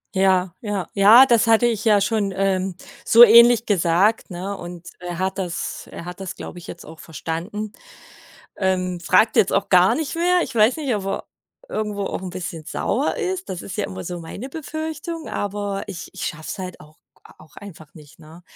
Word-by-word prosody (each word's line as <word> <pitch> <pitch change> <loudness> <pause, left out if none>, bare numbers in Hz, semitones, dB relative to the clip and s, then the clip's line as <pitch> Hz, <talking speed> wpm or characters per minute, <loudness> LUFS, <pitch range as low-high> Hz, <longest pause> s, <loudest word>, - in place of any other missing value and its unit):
Ja, 190 -2 +2
ja. 205 -4 -3
Ja, 215 +6 +8
das 235 -3 +3
hatte 225 +1 +4
ich 225 -3 0
ja 210 -2 +5
schon, 200 -1 0
ähm, 190 -1 0 0.3
so 235 +1 +8
ähnlich 235 +1 +7
gesagt, 195 +3 +2
ne? 185 +3 -5
Und 175 -1 -9
er 175 -1 -6
hat 190 +1 -2
das 175 -2 -4
er 170 - -8
hat 180 +1 -8
das, 185 -1 -6
glaube 175 - -9
ich, 175 - -13
jetzt 170 - -9
auch 160 +1 -12
verstanden. 175 +7 -5 0.9
Ähm, 185 -2 -1
fragt 205 +5 +3
jetzt 190 - +4
auch 200 0 0
gar 185 +4 +5
nicht 305 +1 -3
mehr. 355 +1 +2
Ich 265 - -6
weiß 225 +6 +3
nicht, 280 -6 -1
ob 200 -2 -3
er 195 - -3 0.4
irgendwo 210 -2 -3
auch - - -4
'n 185 - -5
bisschen 170 -3 -6
sauer - - -1
ist. 375 -4 -3
Das 180 - -5
ist 185 - -8
ja - - -1
immer 95 0 -6
so 175 - -5
meine 195 +10 -8
Befürchtung, 315 +1 -6
aber 205 -1 -3
ich 185 -2 -7
ich 190 - -5
schaffe 155 -1 -5
es - - -4
halt 185 -2 -7
auch 155 +1 -17 0.4
auch 155 - -19
einfach 160 -7 -12
nicht, 150 -1 -16
ne, 160 +3 -15
195 Hz, 195 wpm, -22 LUFS, 175-225 Hz, 0.9 s, Ja